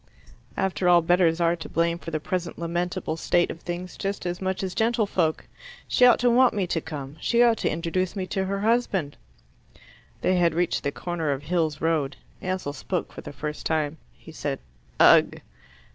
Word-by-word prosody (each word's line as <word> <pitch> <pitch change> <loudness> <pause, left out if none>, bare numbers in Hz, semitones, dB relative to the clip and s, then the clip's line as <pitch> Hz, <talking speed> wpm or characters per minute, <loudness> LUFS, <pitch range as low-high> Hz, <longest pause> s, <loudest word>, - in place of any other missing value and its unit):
After 190 -1 +1
all, 175 -1 +6
bedders 175 -1 +3
are 170 0 +3
to 165 - -9
blame 170 0 0
for 160 - -7
the 155 -1 -2
present 175 +2 -3
lamentable 170 -1 -2
state 175 +1 +1
of 165 - -9
things, 175 +1 -6
just 195 -1 -4
as 175 +1 -3
much 190 0 -2
as 185 -1 -3
gentlefolk. 215 -8 0 0.4
She 250 - +5
ought 245 - +6
to 245 - +4
want 250 0 +4
me 200 -3 0
to 170 -2 -1
come. 145 -2 -7
She 235 +7 +3
ought 235 -2 +4
to - - +1
introduce 170 +4 -2
me 190 -2 -2
to 190 +1 -2
her 195 +1 -2
husband." 210 -9 +1 1.1
They 185 - +2
had 170 -2 +2
reached 175 +1 0
the 140 - -1
corner 170 -1 -3
of 140 0 -3
Hills 160 -2 -1
Road. 150 -4 0 0.2
Ansell 185 -6 -3
spoke 175 +5 -4
for - - -8
the - - -8
first 150 +2 -5
time. 155 -1 -1 0.2
He - - -13
said, 145 -3 -3 0.4
"Ugh!" - - +6
175 Hz, 190 wpm, -25 LUFS, 160-190 Hz, 1.1 s, all